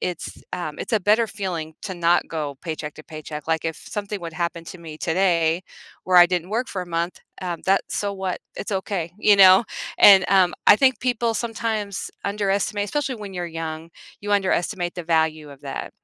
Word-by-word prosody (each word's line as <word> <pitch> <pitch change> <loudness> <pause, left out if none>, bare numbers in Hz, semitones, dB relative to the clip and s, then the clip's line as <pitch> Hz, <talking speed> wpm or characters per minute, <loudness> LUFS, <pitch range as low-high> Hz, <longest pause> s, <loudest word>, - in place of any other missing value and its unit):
it's, 180 -2 -5
um, 175 -4 -4
it's - - -6
a 220 - +4
better 215 +3 +3
feeling 175 -6 -4
to 190 - -5
not 175 0 +2
go 150 -4 -4
paycheck 155 -3 -5
to 155 - -12
paycheck- 155 -1 -8
like, 160 -1 0
if 160 -1 -2
something 205 -1 -5
would 170 -1 -6
happen 170 0 -3
to 180 +2 -9
me 160 -2 -10
today 170 -1 +1 0.4
where 185 -1 +2
I 175 0 +10
didn't 180 0 -2
work 235 +4 -1
for 185 - -4
a 180 - -10
month, 170 +2 -3 0.2
um, 175 -3 -4
that's 195 +1 +1
so 200 -1 -1
what, 190 -2 -4 0.2
it's 205 - -4
okay, 190 -3 -2
you 210 -1 +4
know, 190 +2 +8 0.3
and, 195 -3 +8
um, 185 -2 +4
I - - +10
think 260 +2 +3
people 235 -2 0
sometimes 220 -4 -3
underestimate 205 0 0
especially 275 +4 -2
when 205 -4 -8
you're 175 -1 -4
young, 165 0 -6 0.3
you 205 0 -3
underestimate 185 -2 0
the 175 - -5
value 160 -2 0
of 140 -1 -13
that. 135 -1 -6
180 Hz, 195 wpm, -23 LUFS, 165-205 Hz, 0.4 s, I